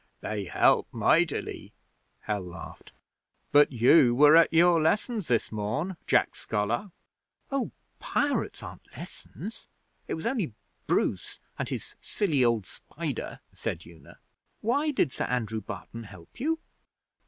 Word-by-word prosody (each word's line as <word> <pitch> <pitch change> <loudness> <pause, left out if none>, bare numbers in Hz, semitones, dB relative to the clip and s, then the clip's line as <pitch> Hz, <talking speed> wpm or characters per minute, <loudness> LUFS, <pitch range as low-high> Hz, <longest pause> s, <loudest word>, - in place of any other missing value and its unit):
'They 105 -2 -3
help 85 - +3
mightily,' - - +1 0.5
Hal 105 -2 -2
laughed. 90 -2 -10 0.6
'But 145 0 +6
you 120 +1 +5
were 150 +4 +7
at 165 0 +6
your 170 0 +5
lessons 210 +4 +1
this 120 -2 +1
morn, 115 - -2
Jack - - +3
Scholar.' 110 - -1 0.6
'Oh, 275 -2 0 0.3
pirates 285 -1 -1
aren't - - -10
lessons. 220 +3 -8 0.4
It - - -2
was 160 - -7
only 195 - -1 0.3
Bruce - - 0 0.2
and - - -2
his - - -5
silly 155 -11 +1
old 115 -4 +2
spider,' - - -6
said 80 - -4
Una. 85 -1 -15 0.4
'Why 280 +8 +1
did 215 - +1
Sir - - -2
Andrew 110 -3 -2
Barton 115 +3 -8
help 95 - -14
you?' 320 +5 +1
140 Hz, 130 wpm, -28 LUFS, -, 0.6 s, were